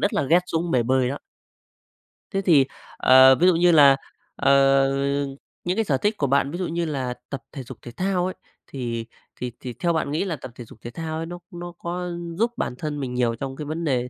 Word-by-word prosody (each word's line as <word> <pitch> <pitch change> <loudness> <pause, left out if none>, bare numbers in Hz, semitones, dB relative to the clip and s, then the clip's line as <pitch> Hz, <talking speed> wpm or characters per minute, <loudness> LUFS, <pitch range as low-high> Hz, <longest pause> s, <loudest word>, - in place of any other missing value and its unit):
rất 200 - +1
là - - +2
ghét 165 +6 +4
xuống 165 0 -2
bề 125 - +3
bơi 130 +1 +2
đó. 140 - -4 1.1
Thế 195 - 0
thì, 155 -8 +5 0.3
ờ, 130 +1 +7
ví 175 +7 +3
dụ 185 - +5
như 175 +1 +4
là, 140 -4 +7 0.4
ờ, 140 -1 +2 1.1
những 180 +1 -1
cái 225 - +2
sở 140 -8 +1
thích 210 +8 0
của 140 - 0
bạn 140 +1 +2
ví 175 - -4
dụ 185 - -2
như 170 +1 -2
là 135 -5 -2 0.2
tập 140 - -5
thể 135 - -7
dục 125 0 -10
thể 120 - -9
thao 185 +5 -1
ấy, 185 - -2 0.3
thì 120 -4 -4 0.4
thì 125 -1 -3
thì 125 -2 -6
theo 170 +8 0
bạn 160 -3 -1
nghĩ 155 +6 0
là 175 -4 -2
tập 130 -4 -10
thể 120 - -9
dục 110 - -16
thể 120 - -7
thao 160 +2 -5
ấy, 165 - -3
nó 175 +1 -7
nó 175 0 -7
có 180 +1 -4 0.3
giúp 230 +3 +1
bản - - -2
thân 150 -2 -3
mình 130 -3 -4
nhiều 120 -2 +1
trong 135 +2 -5
cái 150 - -6
vấn 160 +3 -4
đề 125 -5 0
145 Hz, 240 wpm, -24 LUFS, 130-175 Hz, 1.1 s, ờ